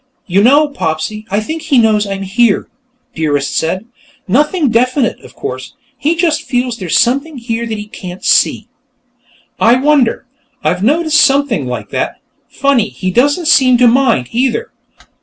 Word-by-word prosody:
"You 190 +2 +1
know, 285 +7 +4
Popsy, 215 - -4
I 200 +2 0
think 315 +9 -5
he 300 -4 +1
knows 215 -3 +3
I'm 195 0 -4
here," 205 +3 +1 0.5
Dearest 145 -3 -1
said. 185 +6 -1 0.4
"Nothing 295 - +1
definite, 250 +2 +1
of - - -16
course; 130 0 -7 0.2
he 305 +6 0
just 330 -3 0
feels 245 -1 -2
there's 185 -6 -1
something 280 +5 0
here 235 -1 -4
that 220 -1 -4
he 210 - -6
can't 185 -5 -9
see." - - +2 0.9
"I 230 +2 +5
wonder. 270 -2 +1 0.4
I've 180 +1 0
noticed 310 +4 +3
something 275 - +1
like 125 - -5
that. - - -2 0.3
Funny, 275 -6 +1
he 185 -1 -4
doesn't 290 - +1
seem 260 -6 +5
to 245 0 +5
mind, 230 - +2
either. 265 - -1
240 Hz, 155 wpm, -14 LUFS, 200-285 Hz, 0.9 s, I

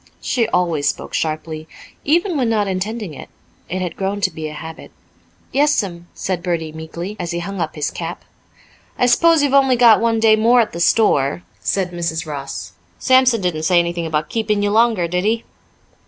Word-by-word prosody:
She 235 -3 0
always 165 -5 +1
spoke - - -5
sharply, 155 0 -3 0.4
even 340 +4 +1
when 255 -5 +1
not 210 -3 +1
intending 195 0 -3
it; - - -10 0.4
it 185 +2 -2
had 175 -2 -4
grown 195 +1 -2
to 185 - +1
be 160 -1 -6
a 155 - -7
habit. 160 +1 -9 0.6
"Yes'm," 200 -12 0
said 185 -2 -3
Bertie 170 -3 -2
meekly, 170 +5 -7
as 175 -2 -3
he 170 - -2
hung 185 +2 -4
up 160 -1 -3
his 150 - -2
cap. - - -6 0.7
"I - - +3
s'pose 325 +5 +4
you've 280 -2 +1
only 270 -2 +5
got 235 -3 +6
one 230 -1 +2
day 220 -1 +5
more 230 +3 +4
at 225 - +1
the 170 - -5
store," 170 -5 +2 0.2
said 190 -2 -1
Mrs. 170 -2 -3
Ross. 135 - -6 0.3
"Sampson 255 -3 +4
didn't 175 -4 -1
say 175 +3 +2
anything 170 -1 0
about 155 -1 -2
keeping 215 -2 0
you 205 - +1
longer, 220 -5 +3
did 180 +2 -1
he?" 225 +2 0
185 Hz, 185 wpm, -19 LUFS, 165-225 Hz, 0.7 s, got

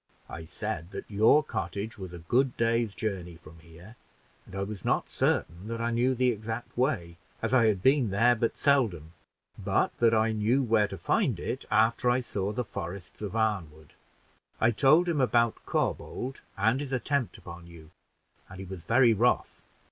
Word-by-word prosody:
"I 80 - -8
said 90 -1 -5
that - - -8
your 110 +9 +5
cottage 105 -4 -4
was 95 -2 -7
a 90 - -8
good 120 +10 0
day's 115 -2 +1
journey 90 -5 -4
from 80 0 -15
here, 85 +8 -15 0.5
and - - -11
I 95 - -2
was 100 -1 -7
not - - 0
certain 85 +5 -1
that 115 0 -4
I 115 0 -1
knew 125 +3 +1
the 125 0 +2
exact 110 +2 -6
way, 100 - -1 0.2
as - - -2
I 120 -3 +5
had 100 -4 0
been 135 -4 +4
there 115 +5 +4
but 115 0 -1
seldom, 105 - +1 0.5
but - - +1
that 115 -1 +4
I 110 +1 +2
knew 110 +5 +1
where 110 -3 +2
to 95 - -7
find 85 - 0
it - - -4
after 115 +2 +2
I 120 +1 +3
saw 105 -5 -3
the 120 +3 -3
forests 90 0 -7
of 105 +1 -5
Arnwood; 90 -9 -2 0.7
I 110 - +4
told 150 +9 +4
him 160 -5 +1
about 120 -2 +1
Corbould 130 +2 -2 0.2
and 115 +5 +2
his 140 -2 -5
attempt 130 0 -1
upon 85 0 -11
you, 85 -1 -14 0.6
and 95 - -11
he 95 - -7
was 95 -1 -8
very 120 +4 +4
wroth. 120 +4 0
110 Hz, 180 wpm, -28 LUFS, 95-120 Hz, 0.7 s, your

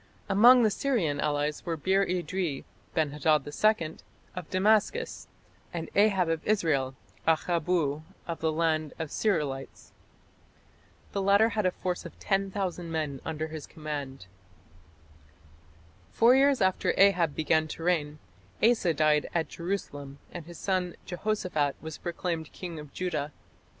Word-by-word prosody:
Among 240 +5 +7
the 215 - +4
Syrian 195 - 0
allies 150 0 -1
were 165 -1 -2
Bir 190 +5 +2
idri 180 -4 -2 0.3
(Ben 155 -3 +1
hadad 150 -1 +2
II) 165 0 +1 0.4
of 180 -3 -6
Damascus, 215 - +1 0.4
and 165 -2 -5
Ahab 200 -3 +4
of 165 -1 -1
Israel 150 -11 +1 0.3
("Akhabbu 160 -2 +1 0.3
of 170 -1 -4
the 160 0 +1
land 155 -2 0
of 160 -2 -4
the - - -10
Sir'ilites"). 145 -10 -2 1.2
The 200 - -1
latter 200 +3 +5
had 210 -3 0
a - - +1
force 180 0 -3
of - - -10
10,000 195 -3 -2
men 150 -4 -2
under 160 0 -3
his 155 -2 -7
command. 145 - -6 1.9
Four 235 +2 +5
years 275 -2 +4
after 190 -1 +2
Ahab 180 -6 +4
began 155 0 +2
to 165 - -7
reign, 155 -4 0 0.5
Asa 215 -8 +3
died 150 0 +2
at 160 -4 0
Jerusalem 145 -6 -5
and 170 -3 -8
his 175 -1 -10
son 185 -3 -1
Jehoshaphat 180 -6 -1
was 160 -1 -8
proclaimed 170 -2 -3
king 170 -3 -7
of 150 -2 -10
Judah. 155 -5 -3
170 Hz, 135 wpm, -28 LUFS, 150-195 Hz, 1.9 s, Among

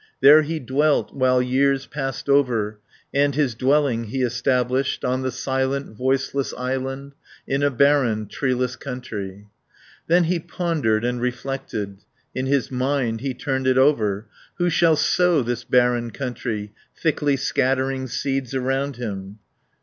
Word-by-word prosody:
There 145 +3 +8
he 160 +1 -3
dwelt, 145 +3 +1
while 130 -1 +3
years 135 +2 +1
passed 135 -2 -5
over, 120 -7 +2 0.3
And 140 0 +2
his 140 -5 +1
dwelling 130 -1 +1
he 130 +4 -2
established 125 +1 0
On 130 +1 0
the 130 - -1
silent, 130 0 -2
voiceless 135 +2 -1
island, 135 +2 -3 0.3
In 135 +1 0
a 145 - +3
barren, 130 -5 +2
treeless 125 +2 -1
country. 105 -7 -7 0.6
Then 175 +2 +4
he 170 +1 0
pondered 155 -11 -1
and 125 0 -1
reflected, 125 -5 -4 0.3
In 130 +1 -2
his 135 -3 +1
mind 125 -3 -1
he 135 -1 -3
turned 130 -2 -2
it 130 0 +3
over, 110 -8 +3
10 110 - -33 0.3
"Who 175 0 +2
shall 165 0 +4
sow 175 -2 +3
this 120 0 -3
barren 120 -1 +2
country, 115 -5 -4 0.3
Thickly 145 -3 +1
scattering 130 0 0
seeds 135 +1 -2
around 135 +1 -1
him?" 100 -4 -6
130 Hz, 140 wpm, -22 LUFS, 120-140 Hz, 0.6 s, There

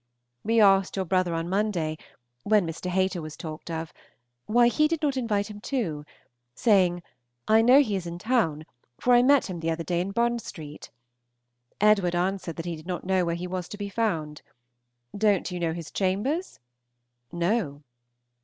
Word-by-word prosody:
We 225 +1 +2
asked 195 -2 +4
your 190 -1 -1
brother 185 -1 +1
on 165 +1 -2
Monday 185 -5 -1 0.5
(when 210 +4 +3
Mr. 165 +2 -5
Hayter 185 -1 0
was 155 -1 -8
talked 155 0 -8
of) 160 -1 -5 0.5
why 240 +2 +5
he 305 +6 +3
did 320 0 -3
not 285 -2 +1
invite 215 -6 0
him 210 -1 -10
too; 175 - -3 0.5
saying, 180 - +3 0.4
"I 220 +1 +5
know 255 +5 +7
he 215 -8 -1
is 180 -3 -4
in 170 0 -6
town, 175 -8 0 0.3
for 250 - +3
I 240 - +7
met 275 +1 +4
him 180 -3 -5
the 165 0 -2
other 165 +1 -2
day 175 0 -1
in 185 - -3
Bond 235 +3 0
St." 155 -8 -9 0.9
Edward 200 -4 +3
answered 180 -1 -1
that 165 - -6
he 170 -1 -3
did 155 +2 -13
not 180 -1 -4
know 190 -1 +2
where 170 -1 -1
he 175 +1 -5
was 180 -1 -4
to 205 - -7
be 205 -1 -5
found. 165 -9 -2 0.7
"Don't 200 -3 +1
you 180 - -4
know 170 -1 0
his 165 -1 -7
chambers?" 210 - -1 0.7
"No." 170 -4 -1
185 Hz, 180 wpm, -26 LUFS, 170-215 Hz, 0.9 s, know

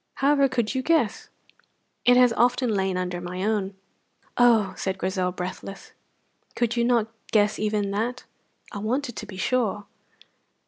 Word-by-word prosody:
"However 280 0 +3
could 240 -3 -1
you 260 - -1
guess!" 260 -8 +1 0.8
"It 245 0 +6
has 250 -2 +5
often 245 0 +2
lain 190 -2 0
under 180 -1 -3
my 180 +1 -5
own." 205 -2 -1 0.6
"Oh!" 225 -6 +4
said 190 -1 -3
Grizel, 185 -1 -1
breathless. 185 +2 -7 0.6
"Could 240 -1 0
you 235 - +1
not 235 -2 +2 0.2
guess 210 -1 +2
even 210 -2 0
that?" 235 +5 -2 0.5
"I 205 - -5
wanted 240 +3 -2
to 215 - -7
be 195 -2 -9
sure. 210 -1 0
215 Hz, 145 wpm, -25 LUFS, 190-245 Hz, 0.8 s, It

